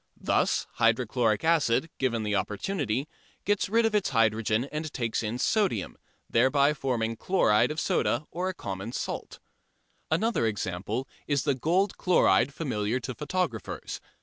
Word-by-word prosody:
Thus -, -, +1 dB
hydrochloric 115 Hz, -1 st, +2 dB
acid, 155 Hz, -3 st, +2 dB
given 120 Hz, -4 st, 0 dB
the 105 Hz, -1 st, -1 dB
opportunity, 125 Hz, -, -1 dB, 0.4 s
gets 205 Hz, -1 st, +1 dB
rid 230 Hz, +2 st, +3 dB
of 225 Hz, -, +1 dB
its 210 Hz, -2 st, +2 dB
hydrogen 115 Hz, -1 st, +2 dB
and 155 Hz, 0 st, -4 dB
takes 115 Hz, -5 st, -1 dB
in 110 Hz, +1 st, -3 dB
sodium, 185 Hz, -, 0 dB, 0.3 s
thereby 140 Hz, +4 st, +3 dB
forming 120 Hz, -5 st, -1 dB
chloride 120 Hz, -, +3 dB
of 155 Hz, +1 st, -3 dB
soda 150 Hz, -, 0 dB
or 185 Hz, +2 st, -2 dB
common 100 Hz, -, -6 dB
salt. -, -, -4 dB, 0.7 s
Another 170 Hz, -, +1 dB
example 105 Hz, +4 st, -3 dB, 0.2 s
is 145 Hz, -2 st, +1 dB
the 140 Hz, -, +2 dB
gold 175 Hz, +9 st, +1 dB
chloride 140 Hz, -, +4 dB
familiar 125 Hz, -6 st, -2 dB
to 130 Hz, +1 st, -5 dB
photographers. 150 Hz, -, -3 dB
130 Hz, 135 wpm, -28 LUFS, 110-160 Hz, 0.7 s, chloride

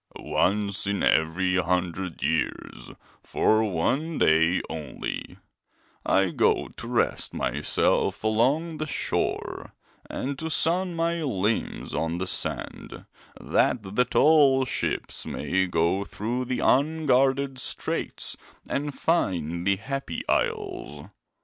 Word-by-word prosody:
'Once 100 Hz, +1 st, 0 dB
in 100 Hz, 0 st, -1 dB
every 90 Hz, +4 st, +2 dB
hundred 90 Hz, -1 st, -1 dB
years, -, -, -2 dB, 0.3 s
for 110 Hz, -1 st, +2 dB
one 145 Hz, -, 0 dB
day 80 Hz, +3 st, +4 dB
only, 75 Hz, -4 st, -6 dB, 0.7 s
I 95 Hz, -2 st, +2 dB
go -, -, +1 dB
to -, -, -9 dB
rest -, -, 0 dB
myself -, -, +1 dB
along 135 Hz, +10 st, +1 dB
the 155 Hz, -, -2 dB
shore -, -, -2 dB, 0.3 s
and 140 Hz, +1 st, -4 dB
to 160 Hz, -, -3 dB
sun 175 Hz, +3 st, +1 dB
my 165 Hz, 0 st, 0 dB
limbs 110 Hz, -6 st, -1 dB
on 80 Hz, +1 st, -1 dB
the 90 Hz, -, -2 dB
sand, 90 Hz, -, -3 dB, 0.3 s
that 115 Hz, -, +1 dB
the 125 Hz, -, +4 dB
tall 135 Hz, 0 st, +4 dB
ships -, -, -2 dB
may 95 Hz, 0 st, 0 dB
go 85 Hz, +3 st, +1 dB
through 120 Hz, +6 st, -3 dB
the 125 Hz, 0 st, -2 dB
unguarded 135 Hz, -2 st, +2 dB
Straits -, -, -1 dB, 0.3 s
and 145 Hz, 0 st, -2 dB
find 85 Hz, -, 0 dB
the 100 Hz, -, +4 dB
Happy 135 Hz, +7 st, -5 dB
Isles. 420 Hz, -6 st, -2 dB
120 Hz, 110 wpm, -26 LUFS, 95-150 Hz, 0.7 s, day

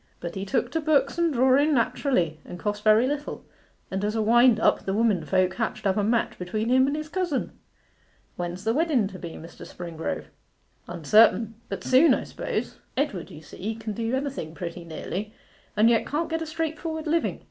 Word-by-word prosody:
'But 170 Hz, -1 st, -5 dB
he 195 Hz, 0 st, -4 dB
took 235 Hz, +4 st, -1 dB
to 325 Hz, -, -1 dB
books 295 Hz, 0 st, +2 dB
and 340 Hz, -1 st, +3 dB
drawing 270 Hz, +3 st, +4 dB
naturally, 220 Hz, -, +1 dB
and 175 Hz, -, -9 dB
cost 205 Hz, +3 st, -3 dB
very 215 Hz, +2 st, +5 dB
little; 290 Hz, +2 st, -4 dB, 0.5 s
and 190 Hz, +1 st, -2 dB
as 210 Hz, +1 st, -1 dB
a 220 Hz, -, +1 dB
wind 240 Hz, +1 st, +5 dB
up -, -, +3 dB
the 195 Hz, -, -2 dB
womenfolk 190 Hz, -4 st, +2 dB
hatched 225 Hz, -1 st, -3 dB
up 190 Hz, -1 st, +2 dB
a 210 Hz, -, +1 dB
match 230 Hz, +3 st, 0 dB
between 215 Hz, +5 st, -2 dB
him 260 Hz, +1 st, +5 dB
and 280 Hz, -, 0 dB
his 305 Hz, 0 st, -4 dB
cousin.' 345 Hz, -4 st, -2 dB, 0.8 s
'When's 175 Hz, +1 st, -5 dB
the 225 Hz, +1 st, +1 dB
wedden 290 Hz, -7 st, +2 dB
to 185 Hz, -, -10 dB
be, 170 Hz, -2 st, -7 dB
Mr. 165 Hz, +1 st, -11 dB
Springrove?' 170 Hz, -2 st, -5 dB, 0.6 s
'Uncertain 215 Hz, +6 st, +4 dB, 0.2 s
but -, -, -5 dB
soon, 265 Hz, +6 st, +5 dB
I -, -, -4 dB
suppose. -, -, -4 dB, 0.2 s
Edward, 265 Hz, -, -1 dB
you 155 Hz, -, -11 dB
see, 210 Hz, +8 st, -5 dB
can 220 Hz, -1 st, -5 dB
do 230 Hz, +3 st, -1 dB
anything 265 Hz, -, -4 dB
pretty 175 Hz, 0 st, -6 dB
nearly, 185 Hz, +6 st, -5 dB, 0.4 s
and 215 Hz, +2 st, +6 dB
yet 230 Hz, -1 st, +3 dB
can't 320 Hz, +3 st, -2 dB
get 325 Hz, 0 st, -1 dB
a 325 Hz, -, -4 dB
straightforward 320 Hz, 0 st, -3 dB
living. 330 Hz, +2 st, 0 dB
225 Hz, 190 wpm, -26 LUFS, 190-285 Hz, 0.8 s, and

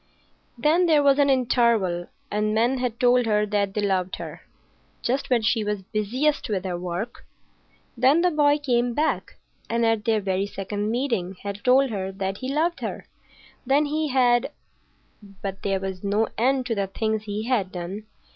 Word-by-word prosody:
Then 315 Hz, +8 st, +3 dB
there 305 Hz, -3 st, +4 dB
was 280 Hz, 0 st, +4 dB
an 285 Hz, -1 st, +4 dB
interval, 235 Hz, -9 st, +2 dB, 0.2 s
and 210 Hz, +1 st, 0 dB
men 240 Hz, +4 st, +2 dB
had 245 Hz, -2 st, -2 dB
told 245 Hz, -1 st, +4 dB
her 210 Hz, -1 st, +2 dB
that 200 Hz, -1 st, -1 dB
they 210 Hz, -, 0 dB
loved 190 Hz, -2 st, 0 dB
her—just 260 Hz, +3 st, -6 dB
when 240 Hz, -3 st, +2 dB
she 220 Hz, 0 st, +2 dB
was 210 Hz, -2 st, -3 dB
busiest 255 Hz, +9 st, 0 dB
with 195 Hz, -3 st, -2 dB
her 180 Hz, -2 st, -2 dB
work. 180 Hz, +6 st, -5 dB, 0.7 s
Then 265 Hz, +7 st, +4 dB
the 360 Hz, 0 st, +3 dB
boy 295 Hz, -1 st, +3 dB
came 245 Hz, -4 st, 0 dB
back, 310 Hz, +1 st, -1 dB, 0.3 s
and 230 Hz, 0 st, +1 dB
at 225 Hz, -2 st, +1 dB
their 225 Hz, -1 st, +2 dB
very 195 Hz, 0 st, -1 dB
second 205 Hz, +1 st, -4 dB
meeting 230 Hz, -7 st, -1 dB
had 200 Hz, 0 st, -5 dB
told 260 Hz, +1 st, +4 dB
her 190 Hz, -2 st, -3 dB
that 195 Hz, 0 st, -3 dB
he 260 Hz, +4 st, -4 dB
loved 325 Hz, +4 st, 0 dB
her. -, -, -5 dB, 0.6 s
Then 275 Hz, +4 st, +3 dB
he 305 Hz, +1 st, -1 dB
had—— 245 Hz, -3 st, +3 dB, 0.9 s
But 195 Hz, -1 st, -4 dB
there 195 Hz, -1 st, 0 dB
was 190 Hz, -1 st, -5 dB
no 205 Hz, +2 st, +1 dB
end 260 Hz, +2 st, +1 dB
to 240 Hz, -, -1 dB
the 200 Hz, -2 st, -1 dB
things 220 Hz, +2 st, -2 dB
he 210 Hz, +1 st, -3 dB
had 210 Hz, -8 st, 0 dB
done. 190 Hz, +4 st, -6 dB
225 Hz, 175 wpm, -24 LUFS, 200-260 Hz, 0.9 s, there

